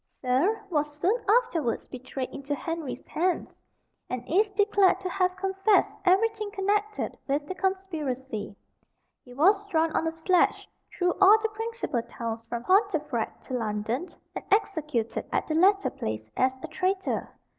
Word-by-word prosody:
Serle 275 - 0
was 295 -1 -1
soon 365 +7 +3 0.2
afterwards 410 - +2
betrayed 255 0 -6
into 280 +1 -4
Henry's 330 -2 -5
hands, 360 +2 -1 0.6
and 250 -1 -3
is 405 +6 +3
declared 405 -2 +3
to 370 - -3
have 365 0 +1
confessed 390 +2 +2
everything 425 +3 +2
connected 415 +1 -1
with 290 +1 0
the 375 - -4
conspiracy. 300 - -3 0.7
He 245 -1 -14
was 390 +8 +4
drawn 325 -4 +1
on 325 - +1
a - - 0
sledge 335 +3 +2 0.2
through 360 -1 +1
all 400 +3 +9
the 445 +1 -1
principal 450 - -3
towns 230 -1 -5
from 235 0 -3
Pontefract 315 - +1
to 260 - -8
London, 225 - -2 0.3
and - - -5
executed 305 - 0
at - - 0
the 310 - -2
latter 390 +5 +4
place 110 0 -5
as 260 0 +2
a - - -3
traitor. 380 +1 -2
340 Hz, 145 wpm, -27 LUFS, 260-395 Hz, 0.7 s, all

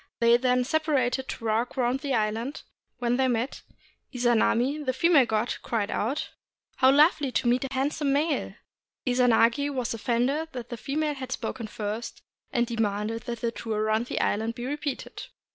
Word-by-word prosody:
They 235 0 +6
then 250 0 +2
separated 270 -3 0
to 230 - -6
walk 225 +4 0
round 250 +1 +1
the 275 -2 -1
island; 225 +5 -2 0.3
when 245 0 0
they 265 0 +3
met, 245 +2 -1 0.5
Izanami, 245 +3 +2
the 260 -2 0
female 285 -2 +4
god, 220 +2 0
cried 215 -3 -2
out, 240 +8 -2 0.2
— - - -44
"How 260 - +5
lovely 290 -1 +4
to - - +1
meet 245 +2 +2
a - - -2
handsome 275 +2 0
male!" 295 +2 0 0.5
Izanagi 245 +2 +3
was 250 -4 -2
offended 255 +8 0
that 245 -2 -6
the 240 - -4
female 300 +5 -1
had 260 -2 -7
spoken 235 -4 -4
first, 215 +1 -5 0.3
and 240 -2 +2
demanded 225 0 -2
that 235 -2 -4
the 235 - 0
tour 220 -2 -3
round 220 +2 +1
the - - -2
island 220 +2 0
be 240 0 -5
repeated. 285 0 -4
245 Hz, 170 wpm, -27 LUFS, 230-275 Hz, 0.5 s, They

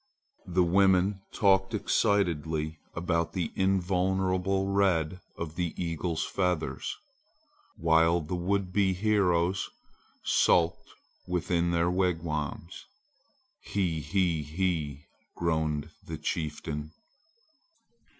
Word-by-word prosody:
The 90 0 +3
women 95 +2 +3
talked 95 -2 +3
excitedly 80 -5 0 0.2
about 85 -1 0
the 90 -5 -2
invulnerable 95 0 +1
red 95 -4 +1 0.2
of 80 -2 -5
the 85 -1 -2
eagle's 85 -1 -2
feathers, 90 -4 -1 0.8
while 80 +1 +4
the 80 +3 -6
would 90 +1 -1
be 95 -1 +3
heroes 95 -2 +1 0.5
sulked 85 0 +2 0.4
within 85 -1 0
their 85 0 +2
wigwams. 85 -2 -2 0.8
"He 90 -6 -1
he 85 0 +1
he!" 75 -3 -2 0.3
groaned 80 -3 -1
the - - -6
chieftain. 75 -1 -4
90 Hz, 90 wpm, -29 LUFS, 80-95 Hz, 0.8 s, while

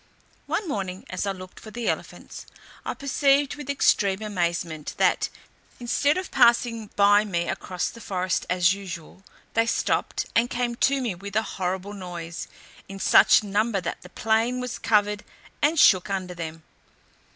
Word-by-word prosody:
One 410 - -1
morning, 190 - -4
as 185 +2 -2
I - - +1
looked 185 -1 -10
for 220 - -11
the 235 +2 -5
elephants, - - -4 0.4
I - - -3
perceived 280 0 +2
with 295 -2 -9
extreme 205 -7 +2
amazement, 170 -6 -2
that, - - +2 0.5
instead 285 +6 +1
of 370 -1 -4
passing 235 -2 +3
by 205 +1 +5
me 175 -5 -2
across 180 -1 -3
the 230 - -12
forest 185 -3 -2
as 180 0 +3
usual, 185 -3 -8 0.3
they 225 0 +2
stopped, - - 0
and 235 +1 +3
came 240 0 -1
to 270 +3 +2
me 235 -6 -1
with 200 +3 -9
a 220 - +3
horrible 190 0 -3
noise, 175 -4 -6 0.4
in 195 - -7
such 195 - +6
number 205 +1 0
that - - -5
the 180 - -13
plain 225 +5 +1
was 250 -1 -4
covered, 210 -1 +2 0.4
and 305 +2 +3
shook 185 -8 +6
under 185 -2 -3
them. 165 -2 -7
205 Hz, 160 wpm, -25 LUFS, 185-235 Hz, 0.5 s, such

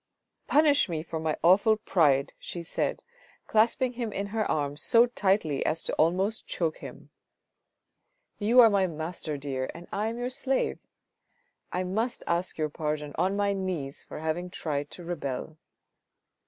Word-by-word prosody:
" - - -56
Punish 290 -6 +4
me 160 -2 -2
for 160 -1 -5
my 155 -1 -1
awful 200 +5 +5
pride," 150 -10 +2
she 175 - -6
said 165 - -1
to - - -28
him, - - -51 0.4
clasping 235 +3 +2
him 235 -3 -3
in 200 0 -3
her 220 -2 0
arms 145 -1 -1
so 235 +6 +5
tightly 195 - +1
as 160 - -1
almost 190 +7 +1
to - - -4
choke 165 -3 0
him. - - -11 0.6
" - - -56 0.5
You 230 +4 +6
are 230 - +8
my 195 -2 +3
master, 160 -2 -4
dear, 135 -2 -3 0.2
I 210 +2 0
am 230 +1 -3
your 245 +1 -3
slave. 265 +1 -1 0.9
I 180 - -1
must 220 +7 -2
ask 170 +1 -1
your 155 -1 0
pardon 150 -1 -3
on 185 +3 +2
my 200 0 +1
knees 180 -8 -3
for - - -9
having 160 +3 -2
tried 145 -5 -3
to 175 - -10
rebel." 160 -2 -4
180 Hz, 170 wpm, -28 LUFS, 155-215 Hz, 0.9 s, are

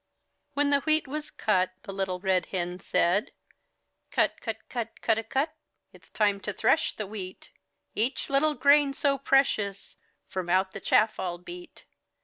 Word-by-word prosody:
tt' - - -51
tr - - -50
When 290 0 +2
the 280 - +4
wheat 310 0 +1
was 300 +2 -5
cut. 185 -4 +1
Little 190 -2 -3
Red 185 -2 +1
Hen 180 -1 -3
said: 180 +3 +1 0.8
"Cut, - - +1
cut, 220 -1 -5
cut, 230 -3 -5
cudawcut! 235 +7 +1 0.4
It's - - -17
time 205 -2 +1
to 205 - -4
thresh 255 +11 +2
the 215 - -4
wheat; 190 -2 -8 0.4
Each 235 +6 -1
little 295 +2 +2
grain 280 +2 +5
so 275 0 +1
precious 215 -8 +1 0.3
From 185 -2 -4
out 190 +1 +2
the 200 - -7
chaff 215 0 +3
I'll 175 -1 -2
beat. 350 - -11
220 Hz, 155 wpm, -28 LUFS, 190-275 Hz, 0.8 s, grain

